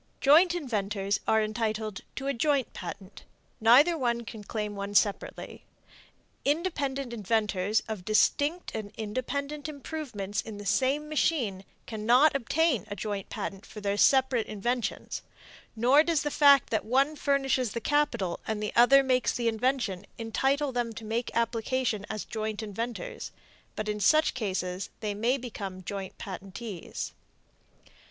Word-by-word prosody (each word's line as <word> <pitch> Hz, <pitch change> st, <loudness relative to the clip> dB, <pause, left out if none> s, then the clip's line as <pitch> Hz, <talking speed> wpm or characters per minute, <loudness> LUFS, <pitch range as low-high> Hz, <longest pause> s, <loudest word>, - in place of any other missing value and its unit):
Joint 335 Hz, +6 st, +6 dB
inventors 205 Hz, -, -1 dB
are 220 Hz, 0 st, +4 dB
entitled 215 Hz, -1 st, -2 dB
to 270 Hz, -, -5 dB
a 275 Hz, -, +1 dB
joint 275 Hz, 0 st, +1 dB
patent; 185 Hz, +3 st, -8 dB, 0.4 s
neither 245 Hz, +9 st, +7 dB, 0.3 s
can 225 Hz, -2 st, -9 dB
claim 210 Hz, 0 st, -4 dB
one 200 Hz, 0 st, -5 dB
separately. 200 Hz, +1 st, 0 dB, 0.8 s
Independent 280 Hz, -5 st, -1 dB
inventors 210 Hz, -2 st, 0 dB
of 215 Hz, -5 st, -5 dB
distinct 285 Hz, -, +2 dB
and 215 Hz, -2 st, -5 dB
independent 280 Hz, +7 st, -3 dB
improvements 260 Hz, -9 st, -4 dB
in 220 Hz, -2 st, -8 dB
the 205 Hz, -, -8 dB
same 275 Hz, +8 st, +1 dB
machine 260 Hz, -, 0 dB, 0.2 s
cannot 240 Hz, +7 st, +3 dB
obtain 275 Hz, -, +1 dB
a 205 Hz, -, -5 dB
joint 205 Hz, -1 st, -4 dB
patent 195 Hz, +1 st, -5 dB
for 215 Hz, -, -10 dB
their 200 Hz, -1 st, -1 dB
separate 260 Hz, 0 st, +3 dB
inventions; 240 Hz, +3 st, -2 dB, 0.5 s
nor 250 Hz, +6 st, +5 dB
does 320 Hz, -2 st, +1 dB
the 295 Hz, -, -1 dB
fact 280 Hz, -3 st, +6 dB
that 220 Hz, -, +1 dB
one 270 Hz, +6 st, +2 dB
furnishes 270 Hz, -5 st, +1 dB
the 235 Hz, -, -2 dB
capital 235 Hz, -10 st, 0 dB
and 215 Hz, -1 st, -2 dB
another 245 Hz, +6 st, +5 dB
makes 255 Hz, -2 st, +2 dB
the 240 Hz, -1 st, 0 dB
invention 225 Hz, -4 st, 0 dB
entitle 270 Hz, +5 st, 0 dB
them 240 Hz, -2 st, -2 dB
to 220 Hz, 0 st, -8 dB
make 230 Hz, +3 st, -2 dB
application 230 Hz, -2 st, 0 dB
as 215 Hz, -1 st, -4 dB
joint 220 Hz, -1 st, -4 dB
inventors; 235 Hz, -, -5 dB, 0.4 s
but 215 Hz, -, -3 dB
in 210 Hz, 0 st, -2 dB
such 310 Hz, +9 st, +4 dB
case 190 Hz, -5 st, -3 dB
they 210 Hz, -2 st, -2 dB
may 235 Hz, +6 st, +1 dB
become 200 Hz, -7 st, -6 dB
joint 195 Hz, 0 st, -6 dB
patentees. 195 Hz, 0 st, -6 dB
230 Hz, 135 wpm, -28 LUFS, 210-275 Hz, 0.8 s, neither